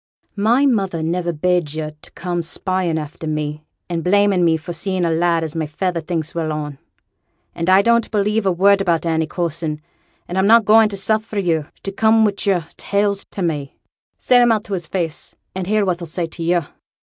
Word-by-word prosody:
'My 230 +7 +3
mother 195 - 0
niver 170 +1 -1
bade 170 -1 0
yo' 155 -1 -3
to - - -13
come 175 -1 -3
spying 175 0 -1
after 155 +1 -6
me, 150 0 -3 0.2
and 170 -2 -3
blaming 200 -1 +3
me 165 -1 +3
for 165 +2 -7
seeing 185 +1 -1
a 165 - +1
lad 165 0 +1
as 160 0 -5
my 160 -2 -2
feyther 170 +3 -2
thinks 160 -1 -3
well 165 -2 -2
on. 150 -2 -5 0.7
An' 170 +2 -2
I 190 +2 +6
don't 235 0 +3
believe 210 0 0
a - - +4
word 195 +3 +4
about 170 -4 +1
Annie 160 -1 0
Coulson; 165 -2 -3 0.5
an' 175 - -4
I'm 190 +1 +3
not 230 0 +6
going 220 0 +6
to 200 - -5
suffer 215 +2 -1
yo' 165 -6 0 0.2
to 195 - -3
come 220 +2 +4
wi' 205 - +2
yo'r 185 -6 +1
tales 200 0 0
to 195 - -5
me; 145 -5 -3 0.4
say 250 - +3
'em 240 -1 +5
out 215 -2 +1
to 205 - -6
his 175 -3 -3
face, 170 -4 -4 0.2
and 185 -1 -4
hear 215 0 +2
what 180 -2 0
he'll 170 - -6
say 170 +2 -2
to 165 +1 -9
yo'.' 170 -1 +1
175 Hz, 205 wpm, -19 LUFS, 160-200 Hz, 0.7 s, I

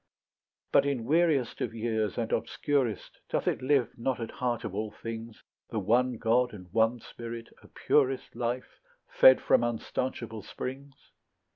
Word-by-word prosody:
But 140 - +5
in 130 -5 -1
weariest 155 -4 +2
of - - -2
years 110 -3 -1
and 115 -2 -2
obscurest 135 -7 -1
Doth - - -1
it - - +1
live 130 -2 +2
not 125 +2 -1
at 115 - -4
heart 120 -2 -2
of 110 -4 -5
all 105 +2 -2
things, 115 +1 -8 0.3
The 115 - -4
one 120 +4 +2
God 120 +2 +2
and 90 -3 -10
one 115 +2 +3
spirit, 115 0 -8
a - - -16
purest 135 -3 +1
Life, 120 +1 -3 0.3
fed - - +7
from - - +4
unstanchable 115 -1 -3
springs? 135 +6 -7
120 Hz, 150 wpm, -29 LUFS, 115-130 Hz, 0.3 s, fed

